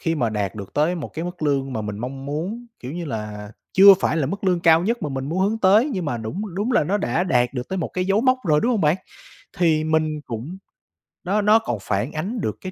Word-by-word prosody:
khi 165 0 0
mà 120 -7 0
đạt 105 -1 -2
được 100 -2 -9
tới 155 +5 +2
một 165 - -5
cái 165 +2 -4
mức 180 -1 -7
lương 135 -3 0
mà 110 - -2
mình 105 -1 -5
mong 135 +3 -6
muốn, 185 +12 -4
kiểu 125 +2 -7
như 175 +1 -4
là, 105 -4 -6 0.2
chưa 195 +1 +9
phải 150 - +1
là 150 -4 +1
mức 195 +6 -4
lương 180 -2 +2
cao 165 -1 +5
nhất 230 +6 -1
mà 150 - -1
mình 135 -1 -4
muốn 170 +5 -2
hướng 220 +1 -2
tới, 215 +7 +4
nhưng 185 -6 -2
mà 120 -5 -2
đúng 175 - -5
đúng 215 +6 -1
là 155 - +3
nó 200 +7 0
đã 160 +3 0
đạt 125 -6 +1
được 125 -1 -4
tới 190 - -3
một 165 - -2
cái 185 - -2
dấu 195 +2 +2
mốc 255 +1 +3
rồi, 150 -2 +3
đúng 245 - +1
hông 230 -5 +1
bạn? 155 +1 +3 0.6
Thì 160 -3 +2
mình 155 -1 0
cũng 130 - -6 0.7
nó 200 +4 +1
nó 210 +2 +5
còn 220 - -3
phản 100 +8 -2
ánh 200 +10 -3
được - - -2
cái 185 - -6
160 Hz, 265 wpm, -22 LUFS, 135-195 Hz, 0.7 s, chưa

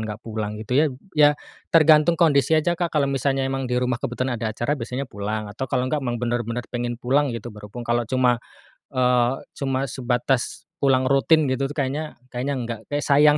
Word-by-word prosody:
nggak 105 0 -6
pulang 110 -2 -3
gitu 110 - -6
ya 155 - +4 0.3
ya 145 -1 +7 0.4
tergantung 155 +1 +6
kondisi 150 -3 +4
aja 155 +3 +2
Kak 175 0 0
kalau 145 -3 +2
misalnya 135 0 0
emang 135 0 -2
di 125 - 0
rumah 125 -1 0
kebetulan 125 +1 -2
ada 110 -1 -2
acara 120 +6 -1
biasanya 125 +2 -4
pulang 105 +1 -3
atau 110 +6 -5
kalau 125 +1 0
nggak 150 +2 0
emang 120 -1 -1
bener-bener 120 0 -2
pengen 120 0 -2
pulang 135 +2 +2
gitu 115 - -7
berhubung 105 +3 -9
kalau 120 0 +1
cuma, 125 -2 +3 0.6
eee, 125 -1 +3 0.2
cuma 135 -2 -1
sebatas 125 0 -1 0.2
pulang 130 -2 +3
rutin 140 +4 +4
gitu 135 +1 0
tuh 145 - -9
kayaknya 145 +2 -2 0.2
kayaknya 130 +4 -2
enggak 115 -3 -4
kayak 145 0 -1
sayang 150 +1 +5
130 Hz, 190 wpm, -23 LUFS, 120-140 Hz, 0.6 s, ya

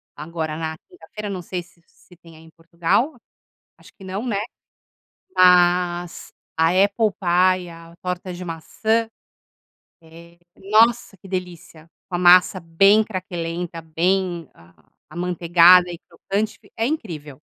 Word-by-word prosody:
agora, 155 0 -5
na 160 -1 -4
quinta-feira, 215 - -9
não 190 -2 -5
sei 180 +1 -5
se 175 0 -22
se 180 - -22
tem 165 -2 -17
aí 160 - -16
em 160 - -17
Portugal. 170 - -1 0.6
Acho - - -18
que 195 - -17
não, 190 +5 -5
né. 225 -5 -1 1.0
Mas 175 -1 +3 0.3
a 160 0 +3
apple 200 +4 +2
pie, 180 0 +2
a 165 0 -14
torta 180 0 -5
de 180 +1 -8
maçã, 220 +7 -1 0.9
eh, 170 +1 -16 0.2
nossa 220 +2 +2
que 190 - -15
delícia. 180 -3 -7 0.2
Com 180 - -3
a - - 0
massa 180 +1 +5
bem 195 +6 +4
craquelenta, 175 -4 -5
bem 175 0 -1 0.6
amanteigada 175 0 +4
e 170 - -8
crocante. 200 +5 -4
Fi - - -24
é 225 - -1
incrível. 160 - -5
180 Hz, 135 wpm, -21 LUFS, 165-195 Hz, 1.0 s, massa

